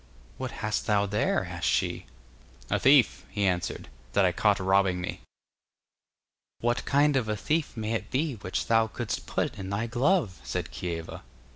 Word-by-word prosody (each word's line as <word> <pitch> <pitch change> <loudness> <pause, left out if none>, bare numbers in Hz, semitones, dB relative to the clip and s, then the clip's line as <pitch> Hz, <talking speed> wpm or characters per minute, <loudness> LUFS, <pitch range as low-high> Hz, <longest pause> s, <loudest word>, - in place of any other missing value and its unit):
'What 130 -1 -3 0.2
hast 110 +1 -1
thou 105 -2 +3
there?' 105 +1 0
asked - - -3
she. - - 0 0.6
'A - - +2
thief,' 135 -2 +5
he 105 -2 -1
answered, 90 -3 -1 0.3
'that - - +4
I - - +3
caught - - +2
robbing 95 -1 +2
me.' 90 - -5 1.4
'What 120 +1 0
kind 145 +1 +3
of 120 -5 +1
a 105 - 0
thief 150 +1 -1
may 110 0 -2
it 115 - -2
be 145 +2 0
which 95 -2 -3
thou 115 -1 +3
couldst 115 0 -4
put - - -2
in 95 -1 -5
thy 100 +3 -1
glove?' 120 - +1
said - - -3
Kieva. 85 -2 -5
110 Hz, 165 wpm, -28 LUFS, 95-130 Hz, 1.4 s, thief